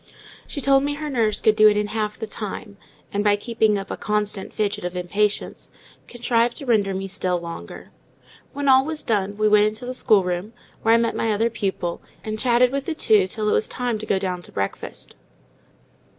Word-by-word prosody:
She 285 - -5
told 275 0 +4
me 290 0 -1
her 300 0 -5
nurse 220 -5 +1
could 215 - +3
do 215 0 +7
it 210 0 +4
in 210 - +1
half 215 -1 -2
the 225 - -4
time, 210 -1 -6 0.4
and, 205 +1 0
by 205 -1 +4
keeping 220 -1 +1
up 195 - -6
a - - -4
constant 210 -1 -2
fidget 205 -4 -2
of 180 0 -4
impatience, 200 +4 -1 0.4
contrived 240 -1 0
to 280 - -6
render 205 -6 +2
me 195 +1 -3
still 180 -2 -1
longer. 170 - -9 0.6
When 285 0 -3
all 265 0 +6
was 315 +1 -3
done, 205 -2 -1
we 215 0 +2
went 210 0 +5
into 220 +4 -4
the 250 - -4
schoolroom, 195 -4 +1 0.3
where 225 +1 +4
I - - +5
met 230 0 0
my 225 - 0
other 225 +3 +1
pupil, 190 -6 -3 0.2
and 215 0 -4
chatted 245 +1 +3
with 275 0 -2
the 330 - -3
two 210 -9 +3
till 210 +2 -2
it - - +3
was - - +2
time 245 -3 -2
to 215 - -7
go 195 - +2
down 185 -2 -3
to - - -10
breakfast. 100 0 -4
215 Hz, 210 wpm, -23 LUFS, 200-235 Hz, 0.6 s, do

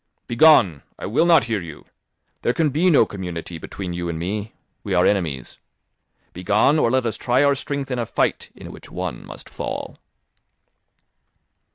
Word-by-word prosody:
"Begone! 120 - +5 0.2
I - - -7
will 130 +11 +2
not 165 -5 +6
hear 110 -3 -2
you. 80 -4 -10 0.6
There 120 - +1
can 160 -2 +2
be 165 +7 +2
no 155 - +5
community 90 -3 -6
between 90 +2 -6
you 85 0 -3
and 85 - -3
me; 100 +6 -4 0.3
we 100 -3 -2
are 90 - +4
enemies. 80 -11 -1 0.7
Begone, 105 - +2
or 120 - +3
let 130 0 +1
us 115 - -2
try 125 +3 +2
our 140 0 +4
strength 140 0 -4
in 125 - -1
a 115 - -2
fight, - - -1
in - - -10
which - - -12
one - - -5
must - - -10
fall." - - -6
110 Hz, 170 wpm, -22 LUFS, 90-135 Hz, 0.7 s, not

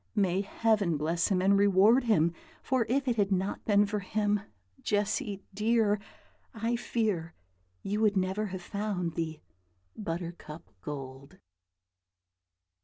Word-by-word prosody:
May 190 -2 +2
Heaven 205 -5 +1
bless 165 +3 0
him 185 -2 +1
and 200 +1 +5
reward 200 +5 +5
him! 170 -7 +3 0.3
for 255 -4 +1
if 270 +2 +1
it 240 -2 +1
had 200 -1 +2
not 190 +1 -1
been 205 -1 +4
for 210 +1 -2
him, 205 +1 0 0.4
Jessy 205 -1 -1
dear, 215 0 +2 0.6
I 230 +2 0
fear 210 -9 -1 0.5
you 205 +2 -1
would 210 -2 +3
never 190 +3 0
have 185 -2 -6
found 195 -4 -2
the 160 -1 -4 0.5
'Buttercup 170 - -6
Gold.'" 135 0 -8
200 Hz, 125 wpm, -30 LUFS, 175-215 Hz, 0.6 s, and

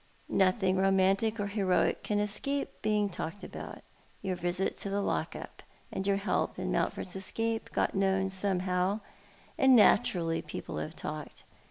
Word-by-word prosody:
Nothing 185 0 +3
romantic 195 +3 +3
or 205 - 0
heroic 200 -3 +1
can 210 - -1
escape 215 +7 -2
being 210 -1 +2
talked 185 +1 -5
about. - - -8 0.4
Your 190 -2 -1
visit 175 +2 -1
to 200 - -2
the 200 +1 0
lock 200 - -1
up, - - -9 0.3
and 190 - -3
your 200 -1 +3
help 200 - -1
in - - -2
Mountford's 180 - -1
escape 225 +4 -2
got - - +1
known 190 -1 +1
somehow 185 +1 0 0.3
— - - -27
and 265 -1 +7
naturally 170 -6 +4
people - - -6
have 75 0 -4
talked. - - -6
195 Hz, 155 wpm, -31 LUFS, 185-205 Hz, 0.4 s, and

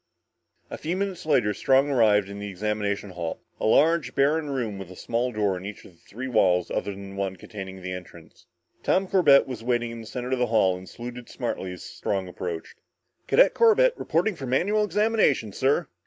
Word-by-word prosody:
A - - -6
few 170 +4 -2
minutes 195 -4 -3
later 120 -9 +3
Strong 135 +7 +3
arrived 105 -6 +4
in 100 0 -8
the 105 0 -5
examination 100 0 -2
hall, 85 -2 -4 0.2
a - - 0
large, 160 +7 +3
barren 145 +2 +2
room 115 -8 -3
with 95 -2 -8
a 95 - -11
small 120 +6 -1
door 105 -4 0
in 90 - -9
each 100 +1 -8
of - - -14
the 85 - -27
three 125 +5 -7
walls 90 -8 +2
other - - -2
than 100 0 -7
the - - -10
one 95 -1 -2
containing 95 0 -9
the 95 - -4
entrance. 90 -3 -11 0.3
Tom 190 +1 +1
Corbett 175 -8 +5
was 125 -4 -7
waiting 120 -1 0
in 115 0 -7
the 110 - -11
center 125 +1 -5
of 130 - 0
the 125 - +2
hall 105 -5 +3
and 90 +1 -10
saluted 120 +1 -8
smartly 105 -6 -4
as 90 - -9
Strong 95 -2 -3
approached. 90 -2 -6 0.5
"Cadet - - +5
Corbett 470 +2 +5
reporting 180 +6 0
for 135 -5 -7
manual 200 +12 +2
examination, 210 - +1
sir!" 140 - +1
115 Hz, 200 wpm, -25 LUFS, 95-145 Hz, 0.5 s, Corbett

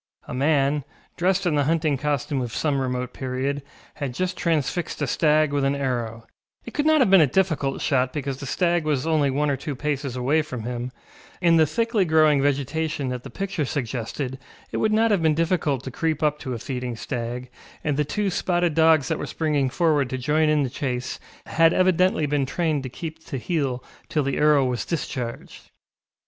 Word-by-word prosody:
A - - -6
man, 140 +1 +2 0.3
dressed 185 +2 +1
in 175 - +2
the 145 -1 +2
hunting 155 -1 +1
costume 145 0 -1
of 120 -3 -4
some 145 -3 0
remote 125 -1 -2
period, 135 +2 -2 0.4
had 135 -4 -4
just 185 +3 -1
transfixed 165 0 -1
a 145 - 0
stag 150 +2 +2
with 140 -1 +1
an 135 +1 +2
arrow; 120 -4 -3 0.4
it 235 - -8
could 295 +1 0
not 315 -2 +5
have 220 -7 +3
been 195 -3 +8
a 150 - +5
difficult 150 -5 0
shot 130 -3 +2
because 140 -2 -4
the 140 - -6
stag 175 +3 +1
was 150 -3 0
only 155 -3 +2
one 145 +2 +1
or - - +1
two 140 +2 -5
paces 140 -2 -2
away 135 +5 +2
from 130 -7 -6
him; 120 +1 -4 0.5
in 170 -2 +4
the 160 -1 +5
thickly 230 - +1
growing 155 -4 +4
vegetation 145 +1 -1
that 125 -1 -4
the - - -9
picture 195 -5 -3
suggested 130 0 -3 0.3
it - - -2
would 215 - +2
not 225 +1 +3
have 200 -4 +2
been 160 -2 +3
difficult 155 -5 0
to 130 - -6
creep 160 +3 -1
up 150 0 +1
to 130 -4 -4
a - - -4
feeding 125 0 -4
stag, 120 +2 -5 0.3
and 150 -2 0
the 150 - +2
two 200 +6 -1
spotted 175 -2 +1
dogs 160 -3 +4
that - - -1
were - - -4
springing 150 -4 0
forward 150 -3 +2
to 130 - -3
join 150 +5 +2
in 150 -1 +3
the 130 - -1
chase 125 -2 -3 0.3
had 165 0 +4
evidently 185 -3 +3
been 145 -2 0
trained 155 -1 0
to 130 - -6
keep 160 +4 -7
to 135 - -5
heel 135 -4 -2 0.3
till 150 - +1
the 135 0 -1
arrow 150 -2 +4
was 125 -2 -1
discharged. 130 -7 -5
145 Hz, 200 wpm, -24 LUFS, 130-160 Hz, 0.5 s, been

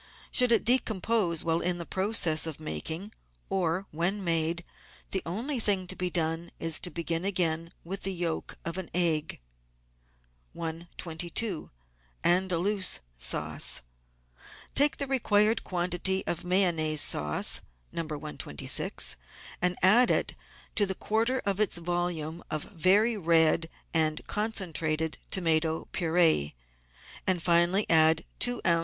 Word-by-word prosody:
Should 250 -1 +2
it 230 - +4
decompose 220 -7 +2
while 165 0 0
in 180 0 -1
the 170 - -6
process 190 -5 +1
of 160 - -5
making 160 - -5 0.4
or 185 0 0
when 180 +6 -1
made, 165 0 +1 0.5
the 190 - -1
only 240 - -3
thing 200 -4 +1
to 185 - -6
be 180 -1 -2
done 165 0 -1
is 165 -1 +3
to 180 - -3
begin 170 0 -3
it - - -2
again 170 -3 0
with 190 +3 -4
the 195 - 0
yolk 170 -3 -4
of 170 +2 -3
an 185 - -6
egg. 165 -4 +1 1.2
I22~ANDAL0USE 170 - -1 0.2
SAUCE - - -1 0.9
Take 290 +1 +5
the 280 - -2
required 220 -5 +2
quantity 180 +1 -1
of 170 - -1
Mayonnaise 170 -5 +3
sauce 75 0 +2 0.3
(No. 170 - -2
126) 150 - -1 0.4
and 180 0 +2
add 235 +7 +6
to - - +3
it - - -2 0.5
the 190 - -2
quarter 230 +7 -1
of 200 0 0
its 210 -4 +2
volume 170 -1 -3
of 155 -2 -2
very 205 +6 +3
red 165 -2 +3 0.2
and 155 -1 +1
con 215 +2 -2
centrated 160 -5 -2
tomato 160 -3 0
pur6e, 165 - +2 0.7
and 180 -3 +1
finally 175 +4 +3
add 160 0 +4
two 245 -1 +1
oz. 170 -1 +4
175 Hz, 130 wpm, -28 LUFS, 160-195 Hz, 1.2 s, add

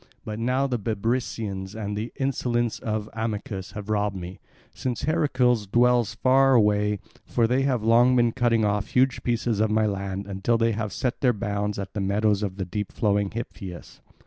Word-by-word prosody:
But 105 0 -5
now 130 +4 +1
the 125 -3 -1
Bebrycians 105 -2 -2
and 105 -2 -4
the 110 +3 -4
insolence 120 -4 -1
of 110 -1 -3
Amycus 105 -4 -4
have 105 -1 -7
robbed 105 -1 0
me, 90 0 -7 0.3
since 125 -2 -3
Heracles 130 -8 +2
dwells 120 0 +3
far 135 +2 +4
away, 105 -2 +3 0.3
for 115 - +1
they 125 +4 +2
have 130 -5 0
long 120 +3 +5
been 120 -1 +3
cutting 115 -3 +2
off 105 0 0
huge 130 0 +2
pieces 120 -2 0
of 110 0 +2
my 110 0 +2
land 100 -1 -3
until 100 +4 0
they 115 0 +2
have 110 -1 -3
set 125 +5 -2
their 125 -2 +4
bounds 105 0 -2
at 95 -1 -5
the 105 - -2
meadows 100 +1 +1
of 100 -2 -3
deep 105 -1 -3
flowing 100 -3 +1
Hypius. 95 -5 -8
110 Hz, 175 wpm, -25 LUFS, 100-120 Hz, 0.3 s, long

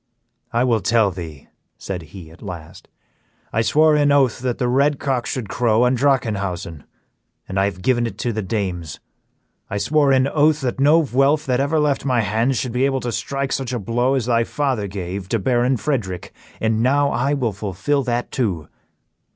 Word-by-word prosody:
"I 120 +1 +2
will 120 -3 +2
tell 110 -2 +3
thee," 80 -6 -9 0.3
said 95 -3 -5
he, 80 0 -12
at 85 - -17
last; 90 -2 -9 0.7
"I 115 - +2
swore 155 +6 +4
an 145 -1 +3
oath 135 -4 +3
that 125 -1 -2
the 125 - 0
red 140 +3 +2
cock 130 -4 -1
should 125 -5 -3
crow 115 +1 +2
on 125 +1 +3
Drachenhausen, 105 - -1 0.6
and 95 - -2
I 95 - +3
have 90 -2 -4
given 120 -2 +2
it - - -8
to 120 - -2
the 110 - -2
dames. 90 -6 -3 0.7
I 100 - -2
swore 145 +5 +2
an 130 0 +3
oath 150 +1 +2
that 130 0 -2
no 155 +4 +5
Vuelph 140 +3 +2
that 125 -1 +1
ever 145 +3 +1
left 150 -2 +1
my 125 -4 +2
hands 115 +5 0
should 125 - -2
be 125 +3 +1
able 135 -1 0
to 120 - -3
strike 135 +4 -3
such 130 -2 -2
a - - 0
blow 120 +5 0
as 130 -5 -1
thy 115 -1 +2
father 130 -5 -1
gave 95 0 -5
to 115 - +1
Baron 125 +4 +1
Frederick, 105 -7 -3 0.3
and 110 0 +1
now 140 +3 +2
I 140 +4 +1
will 120 -6 -1
fulfil 105 +8 -1
that 120 -1 -2
too. 95 - -2
120 Hz, 190 wpm, -21 LUFS, 100-135 Hz, 0.7 s, no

